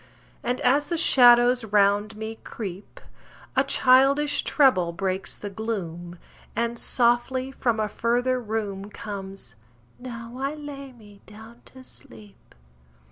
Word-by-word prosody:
And 250 +1 -2
as 275 +4 +2
the 340 - -1
shadows 245 -4 +6
round 205 0 +2
me 220 +1 -6
creep, 195 -3 -8 0.6
A - - +4
childish 275 +3 +3
trebble 255 - +3
breaks 190 +2 -2
the 205 - -7
gloom, 175 -5 -5 0.4
And 235 0 -1
softly 250 +2 +1
from 235 -4 -1
a 215 - 0
further 245 +4 0
room 210 -3 -4
Comes: 195 -2 -8 0.5
"Now 235 -1 -8
I 275 +3 -2
lay 280 -2 -9
me 210 -4 -17
down 220 +3 -14
to 260 0 -14
sleep." 105 - -13
230 Hz, 125 wpm, -25 LUFS, 205-255 Hz, 0.6 s, shadows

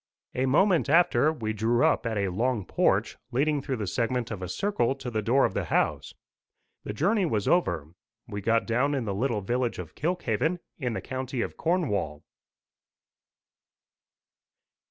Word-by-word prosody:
A 130 +1 0
moment 170 +3 +3
after, 165 -1 +4
we 110 -8 -3
drew 115 +3 +2
up - - +2
at 110 -2 -2
a 100 -1 0
long 110 +2 -1
porch, - - +1
leading 145 +3 +1
through 135 -1 -2
the 110 -4 -3
segment 115 +4 -1
of 105 -4 -5
a 90 - -4
circle 135 - 0
to 130 -2 -6
the 110 -1 -1
door 125 +6 +3
of - - -1
the - - -2
house. - - 0 0.7
The - - -4
journey 195 - +1
was 105 -8 -1
over. 85 - +1 0.3
We 100 -3 -5
got 115 +3 +2
down 125 +5 +1
in 130 -4 -2
the 100 - -2
little 115 +1 0
village 120 +4 -1
of 85 -4 -7
Kilkhaven, 160 - 0 0.2
in 125 -5 -2
the - - -3
county 130 -1 -4
of - - -4
Cornwall. 105 - -1
120 Hz, 165 wpm, -27 LUFS, 105-145 Hz, 0.7 s, after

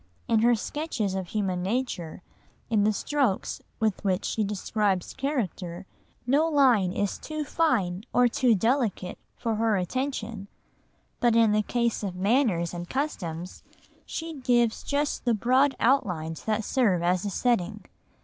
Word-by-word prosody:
In 225 - +3
her 240 +2 +4
sketches 230 -5 -3
of 190 -2 -3
human 190 -3 -1
nature, 185 -6 -3 0.5
in 210 -2 +3
the 215 - +4
strokes 255 -2 -1 0.2
with 215 -4 0
which 190 -1 0
she 220 - 0
describes 200 -2 -1
character, 200 - -3 0.4
no 285 +6 +3
line 255 - +4
is 200 +1 -2
too 310 -1 -4
fine 220 - 0
or 245 0 +4
too 240 0 +3
delicate 225 -4 0 0.2
for 230 -3 -1
her 220 -2 +2
attention; 220 0 -3 0.7
but 240 -2 +3
in 225 -2 +5
the 215 0 +3
case 235 +1 0
of 195 -4 -4
manners 195 -4 +1
and 175 0 -6
customs 180 - -4 0.5
she 325 0 -5
gives 240 -3 +2
just 290 +1 -1
the 240 -2 +2
broad 260 +5 +3
outlines 180 - 0
that 220 0 0
serve 200 -8 +2
as 180 +2 +1
a 205 - -2
setting. 210 -2 0
220 Hz, 145 wpm, -27 LUFS, 190-255 Hz, 0.7 s, in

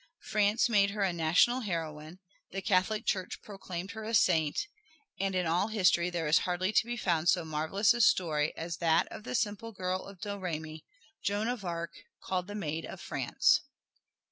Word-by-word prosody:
France 210 +3 +3
made 205 -4 +4
her 200 0 -2
a 190 -2 +1
national 170 +10 +3
heroine, 165 -6 -4 0.3
the 195 - -4
Catholic 210 +3 +1
Church 185 -2 -1
proclaimed 190 -2 -6
her 220 -1 -7
a 225 +1 -1
Saint, 160 - +3 0.5
and 195 0 0
in 180 -1 +1
all 175 +5 +1
history 180 -5 +3
there 170 -2 -2
is 150 - +5
hardly 185 +2 -1
to - - +4
be 240 0 -3
found 170 -5 +1
so 175 -3 +3
marvelous 160 +8 +2
a 240 - 0
story 155 -7 +3
as 165 -1 -4
that 165 -2 +2
of 215 - -9
the - - -3
simple 225 0 -1
girl 185 -2 -3
of 195 -2 -12
Domremy, 165 -6 -5 0.4
Joan 205 +2 0
of 245 -4 -3
Arc, 170 -1 -3 0.3
called 185 -1 -2
the 205 - -6
Maid 165 -5 -3
of - - -8
France. - - +2
185 Hz, 180 wpm, -31 LUFS, 165-205 Hz, 0.5 s, is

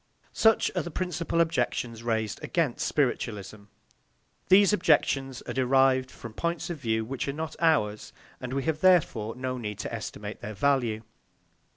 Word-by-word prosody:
Such 225 -1 +3
are - - +1
the - - -6
principal 170 -1 -1
objections 120 -7 -1
raised 110 -3 -2
against 160 -8 0
spiritualism. 105 -7 -2 0.8
These 200 +2 +6
objections 135 -8 +1
are - - -5
derived 130 0 +3
from 120 -3 -10
points 170 +5 -2
of 165 - -6
view 110 -3 -1
which 130 +3 -4
are 140 - -1
not 160 +1 -5
ours, 140 -11 +1 0.3
and 125 -1 -6
we 135 0 -1
have 155 -1 -1
therefore 135 -12 +3
no 130 0 -3
need 105 -3 -5
to - - -5
estimate 105 0 -6
their 105 0 -6
value. 120 -2 +1
130 Hz, 155 wpm, -27 LUFS, 110-160 Hz, 0.8 s, These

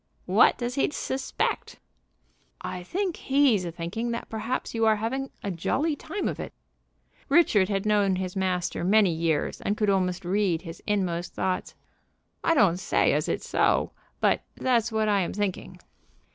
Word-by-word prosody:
"What - - +5
does 240 0 -3
he 275 - +1
suspect?" 270 -2 -3 0.8
"I 180 - -5
think 365 - -2
he's 265 -8 +3
a 170 - -4
thinking 175 +8 -4
that 235 0 -4
perhaps 225 +3 -3
you 225 -1 0
are 220 - +5
having 260 +6 -3
a 200 - -2
jolly 285 - 0
time 330 +7 -4
of - - -3
it." - - -6 0.8
Richard 210 - +4
had 195 0 -1
known 205 -3 +3
his 185 0 -4
master 185 -3 -1
many 200 0 +4
years, 160 -2 -1
and 205 - -1
could 210 -2 +2
almost 180 -2 0
read 185 -3 +1
his 165 -1 -9
inmost 180 -4 -1
thoughts. 185 -1 -2 0.7
"I 330 - +3
don't 185 - +4
say 190 - +2
as - - 0
it - - -2
so, - - +1 0.3
but - - +2
that's 240 -2 +1
what 220 -1 +1
I 205 -1 +3
am 175 - -2
thinking." 205 -3 -3
205 Hz, 165 wpm, -26 LUFS, 180-240 Hz, 0.8 s, What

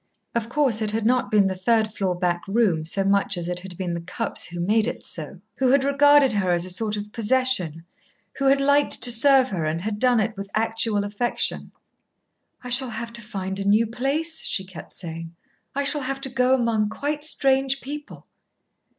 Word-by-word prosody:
Of 230 -1 -2
course 250 -5 +1
it 215 - 0
had 215 +1 -2
not 250 +1 +1
been 210 -2 +3
the 190 - 0
third 215 +3 0
floor 190 -4 -1
back 175 -1 -1
room 195 -6 +1
so 195 +4 -1
much 200 0 +1
as 170 -1 -4
it 180 0 -3
had 180 -1 -10
been 180 -2 -3
the 170 - -4
Cupps 190 +6 -1
who 175 +1 -8
made 210 +5 +1
it - - -5
so, 170 +3 -7 0.2
who 260 -1 +2
had 270 +1 +3
regarded 280 -2 +4
her 195 -3 0
as 175 0 +1
a 185 - -6
sort 210 +3 -1
of 205 0 -7
possession, 215 -9 0 0.5
who 275 - -1
had 275 +1 +4
liked 285 +1 +2
to 245 - +3
serve 265 +2 +7
her, 180 -7 -3
and 155 +2 -2
had 210 +1 -4
done 250 -1 +3
it 215 0 -1
with 195 0 -7
actual 225 -1 +1
affection. 205 +4 -2 0.9
"I 250 - -7
shall 255 +1 +4
have 230 0 -6
to 235 - -6
find 195 -3 -5
a - - -2
new 210 +3 +3
place," 280 +8 -2
she 190 - -2
kept 185 -2 -11
saying. 165 -1 -7 0.4
"I 280 - 0
shall 290 +1 0
have 270 +1 -4
to 270 - -2
go 255 0 +2
among 230 -4 0
quite 290 +5 -4
strange 270 -2 +2
people." 290 +3 -9
220 Hz, 205 wpm, -23 LUFS, 190-260 Hz, 0.9 s, serve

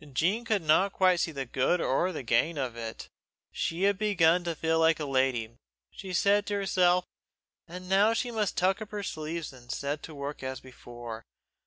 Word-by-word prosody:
Jean 185 - +1
could 215 -6 0
not 175 +6 +4
quite 185 -2 +3
see 165 - 0
the 135 -3 -4
good 130 +8 +1
or 175 +5 +1
the 155 - -5
gain 125 +8 +1
of 130 -4 -3
it. 115 -1 -7 0.4
She 170 +3 -2
had 200 -1 +2
begun 180 -5 +3
to 170 -1 -2
feel 160 +1 +1
like 160 0 +4
a 150 - -2
lady, 130 -4 0 0.3
she 190 - -8
said 200 +3 +2
to 205 - -1
herself, 180 -2 +2 0.6
and 180 +2 -9
now 200 +4 +4
she 240 +1 -1
must 215 -4 -1
tuck 190 +3 +2
up 215 - -6
her 205 -1 -5
sleeves 155 -3 -5
and 120 -1 -10
set 145 +1 -3
to 160 - -9
work 140 +1 -6
as 130 0 -4
before. 120 -3 -10
165 Hz, 195 wpm, -29 LUFS, 135-190 Hz, 0.6 s, not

